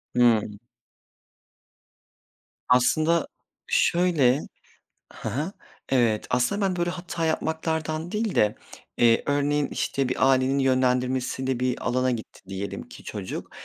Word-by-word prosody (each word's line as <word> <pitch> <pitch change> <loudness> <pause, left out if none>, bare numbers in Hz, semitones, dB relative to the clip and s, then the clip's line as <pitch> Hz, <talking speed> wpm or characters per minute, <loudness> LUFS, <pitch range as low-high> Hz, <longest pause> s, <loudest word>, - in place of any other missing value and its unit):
Hımm. 110 -4 +3 2.1
Aslında, 155 +7 +3 0.4
şöyle 160 -7 +3 0.7
Hı - - -6
hı, 155 - -3 0.4
evet. 115 -5 +2
Aslında, 125 +12 +1
ben 190 -2 +1
böyle 175 0 0
hata 175 -2 -4
yapmaktan 160 0 -2
değil 215 -1 -1
de, 105 0 +3 0.4
eee, 115 -1 +4
örneğin, 145 0 +1
işte, 135 -2 -1
bir 130 +1 +3
ailenin 130 +1 +2
yönlendirmesiyle 130 0 +1
bir 125 0 -1
alana 130 +1 +1
gitti 115 -3 -6
diyelim 95 +3 -5
ki - - -13
çocuk. 100 -3 -6
130 Hz, 110 wpm, -25 LUFS, 125-160 Hz, 2.1 s, eee